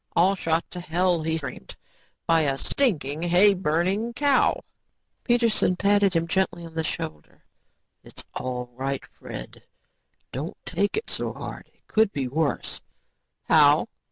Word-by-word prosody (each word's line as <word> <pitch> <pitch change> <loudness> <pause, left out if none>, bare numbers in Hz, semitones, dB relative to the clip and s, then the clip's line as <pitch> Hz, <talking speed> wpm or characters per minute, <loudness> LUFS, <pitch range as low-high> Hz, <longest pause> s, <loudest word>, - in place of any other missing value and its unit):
"All 180 +3 +5
shot 165 -3 0
to 180 - -6
hell," 175 0 +1
he 160 +1 0
screamed, 140 -5 -7 0.5
"by 165 -1 +4
a 140 -3 +1
stinking, 155 - 0
hayburning 185 +3 +2
cow." 285 -1 +3 0.6
Peterson 235 -6 +2
patted 200 -1 +3
him 165 0 +1
gently 175 -1 0
on 165 - -11
the 160 0 -1
shoulder. 75 - -6 0.6
"It's - - -8
all 125 -1 -4
right, 135 +2 -3
Fred. - - -10 0.7
Don't 155 - -5
take 205 - 0
it 435 - -4
so - - -3
hard. - - -8
It - - -39
could 220 -2 +2
be 135 -6 -2
worse." 150 +3 -2 0.6
"How?" - - +5
170 Hz, 135 wpm, -25 LUFS, 150-200 Hz, 0.7 s, All